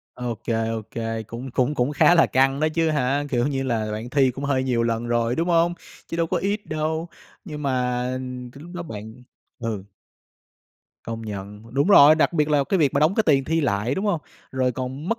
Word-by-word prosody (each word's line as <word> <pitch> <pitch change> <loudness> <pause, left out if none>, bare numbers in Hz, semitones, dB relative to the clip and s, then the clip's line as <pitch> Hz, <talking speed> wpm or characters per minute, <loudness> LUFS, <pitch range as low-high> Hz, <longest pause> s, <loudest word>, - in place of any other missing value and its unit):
Ô 120 -2 -3
kê, 115 -1 0
ô 115 -1 -3
kê, 115 -1 -3
cũng 115 +4 -8
cũng 130 +4 +1
cũng 130 +2 0
khá 175 - +5
là 165 - +5
căng 135 +2 +2
đó 155 - +3
chứ 165 -1 +2
hả? 145 -1 0
Kiểu 120 0 +1
như 135 -2 -1
là, 110 -5 -1
bạn 110 +3 -5
thi 135 -2 +3
cũng 135 +3 -7
hơi 135 -2 +1
nhiều 125 -3 +1
lần 115 0 -1
rồi, 120 +1 0
đúng 170 +2 0
hông? 170 0 +3 0.3
Chứ 165 - -4
đâu 165 - +1
có 180 - -1
ít 200 +4 -2
đâu, 160 +2 -2 0.4
nhưng 150 -4 -7
mà, 125 -2 0
ừm, 125 -1 -6
cái 140 +4 -13
lúc 175 - -11
đó 175 - -4
bạn 110 -4 -9 0.4
ừ. 110 -5 -4 1.2
Công 115 0 -5
nhận, 105 +2 -8
đúng 140 +7 +2
rồi, 155 -6 +8
đặc 155 - +2
biệt 150 -3 +1
là 145 -2 +3
cái 190 - 0
việc 145 -5 +3
mà 140 - +2
đóng 155 +5 +3
cái 220 - +3
tiền 140 -4 +4
thi 165 +2 +1
lại, 110 -1 0
đúng 190 - -2
hông? 170 -6 +1 0.3
Rồi 130 -1 +1
còn 130 +6 -5
mất 230 - 0
130 Hz, 230 wpm, -23 LUFS, 115-155 Hz, 1.2 s, rồi